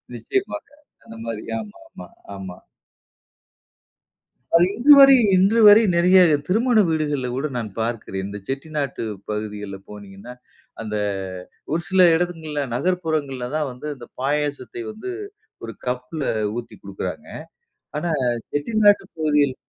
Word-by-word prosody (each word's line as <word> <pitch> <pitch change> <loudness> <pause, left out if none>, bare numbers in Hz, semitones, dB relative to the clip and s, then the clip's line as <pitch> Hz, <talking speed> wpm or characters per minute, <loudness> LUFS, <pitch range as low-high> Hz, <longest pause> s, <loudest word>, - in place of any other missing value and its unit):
நிச்சயமாக. 390 -5 -3 0.4
அந்த 115 - -12
மாரி. 115 -2 -5
ஆமாமா, 100 -4 -11 0.3
ஆமா. 95 -2 -8 2.0
அது 170 +1 +6
இன்று 280 +5 +7
வரை 275 0 +9 0.2
இன்று 200 +5 +3
வரை 210 +2 +8
நிறைய 180 +2 +5 0.3
திருமண 230 +5 +2
வீடுகள்ல 150 -5 -1
கூட 135 +4 -2
நான் 115 -3 -4
பார்க்கிறேன். 110 -4 -3
இந்த 105 +1 -7
செட்டிநாட்டு 140 -1 -4 0.3
பகுதிகள்ல 105 -2 -5
போனீங்கன்னா, 105 +3 -11 0.5
அந்த 105 -1 -4 0.8
ஒரு 170 - 0
சில 190 -1 +4
இடங்கள்ல 160 -4 -2
நகர்ப்புறங்கள்ல 155 -6 -1
தான் 150 -3 -1
வந்து 125 +4 -9
இந்த 120 -2 -12
பாயாசத்தை 145 -3 -2
வந்து, 220 - -7 0.5
ஒரு 115 - -7
கப்ல 125 +4 -3 0.3
ஊத்தி 120 - -7
குடுக்கிறாங்க. 100 -1 -6 0.7
ஆனா, 165 +3 -2 0.4
செட்டிநாட்டு 205 +7 +3
பகுதியில். 150 -3 +2
145 Hz, 115 wpm, -22 LUFS, 115-175 Hz, 2.0 s, வரை